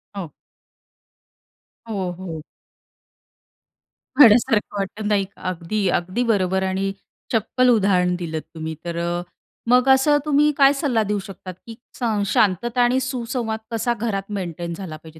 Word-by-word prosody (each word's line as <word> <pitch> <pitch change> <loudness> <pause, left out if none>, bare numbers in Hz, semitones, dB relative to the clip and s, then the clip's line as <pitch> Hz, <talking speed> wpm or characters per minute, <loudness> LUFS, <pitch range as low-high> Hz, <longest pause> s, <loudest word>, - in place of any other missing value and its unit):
हो. 175 -7 -6 1.6
हो, 195 -5 -3
हो. 170 -4 -6 1.8
वेड्यासारखं 220 -4 +5
वाटतं 200 +2 -4
नाही 205 -2 +2
का, 195 - -21
अगदी, 185 +3 -2
अगदी 185 +8 -3
बरोबर. 190 -2 +1
आणि 190 +1 -1 0.4
चप्पल 250 +3 +2
उदाहरण 190 -6 +3
दिलंत 160 -3 -4
तुम्ही. 160 0 -5
तर 170 -1 -4
अ, 175 +1 -1 0.5
मग 250 +2 +4
असं 265 +3 +5
तुम्ही 295 0 +3
काय 275 0 +6
सल्ला 270 -6 0
देऊ 205 0 -1
शकतात? 190 -2 -9
की 225 - -8 0.2
सं 220 -4 0
शांतता 215 +5 +1
आणि 245 +2 +3
सुसंवाद 235 -3 -3
कसा 235 +1 0
घरात 195 -2 -3
मेंटेन 170 -2 -5
झाला 165 -3 -7
पाहिजे? 160 0 -15
200 Hz, 135 wpm, -22 LUFS, 180-240 Hz, 1.8 s, काय